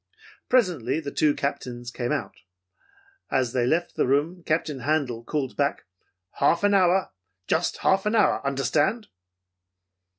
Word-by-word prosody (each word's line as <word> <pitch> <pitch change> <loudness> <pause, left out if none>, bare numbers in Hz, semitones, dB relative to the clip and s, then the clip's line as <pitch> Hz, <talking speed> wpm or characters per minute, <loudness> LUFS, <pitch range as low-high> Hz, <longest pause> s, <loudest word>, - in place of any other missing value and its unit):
Presently 170 - +2
the 145 -3 -6
two 150 0 +2
Captains 125 -4 -4
came 120 -1 -3
out. - - -2 1.0
As 130 -3 0
they 125 -2 +1
left 170 +6 0
the - - +1
room 150 +7 0
Captain 155 -3 -1
Handel 130 -4 -1
called 135 0 -3
back, 140 0 -1 0.5
'Half 170 +6 +3
an 205 0 +4
hour. 190 -1 +3 0.3
Just 165 - 0
half 190 +2 +2
an 215 - +1
hour, 210 - +3
understand!' 145 - 0
145 Hz, 135 wpm, -25 LUFS, 130-175 Hz, 1.0 s, an